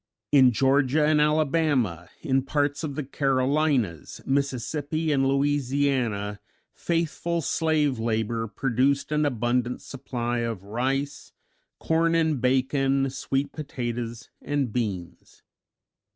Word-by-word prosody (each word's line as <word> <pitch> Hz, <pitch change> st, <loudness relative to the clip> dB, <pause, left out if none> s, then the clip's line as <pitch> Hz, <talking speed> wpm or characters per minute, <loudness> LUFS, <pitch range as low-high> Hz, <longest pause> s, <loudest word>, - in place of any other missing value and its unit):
In 130 Hz, -3 st, +6 dB
Georgia 135 Hz, +4 st, +3 dB
and 150 Hz, 0 st, +3 dB
Alabama, 150 Hz, -, +1 dB
in 135 Hz, -1 st, +1 dB
parts 145 Hz, +2 st, -1 dB
of 145 Hz, -3 st, -3 dB
the 150 Hz, -, -2 dB
Carolinas, 135 Hz, -, 0 dB
Mississippi 140 Hz, +3 st, -1 dB
and 135 Hz, -2 st, +2 dB
Louisiana 135 Hz, -7 st, 0 dB, 0.3 s
faithful 170 Hz, 0 st, -1 dB
slave 150 Hz, -4 st, +1 dB
labor 115 Hz, 0 st, -1 dB
produced 135 Hz, +5 st, 0 dB
an 150 Hz, -1 st, +2 dB
abundant 125 Hz, 0 st, 0 dB
supply 120 Hz, -2 st, -4 dB
of 115 Hz, -5 st, -3 dB
rice, 135 Hz, +7 st, -3 dB, 0.5 s
corn 165 Hz, +1 st, +2 dB
and 160 Hz, -5 st, +1 dB
bacon, 135 Hz, +1 st, +1 dB
sweet 135 Hz, +1 st, -2 dB
potatoes 120 Hz, -6 st, -5 dB
and 140 Hz, -5 st, -1 dB
beans. 100 Hz, -8 st, -5 dB
135 Hz, 105 wpm, -26 LUFS, 120-145 Hz, 0.5 s, In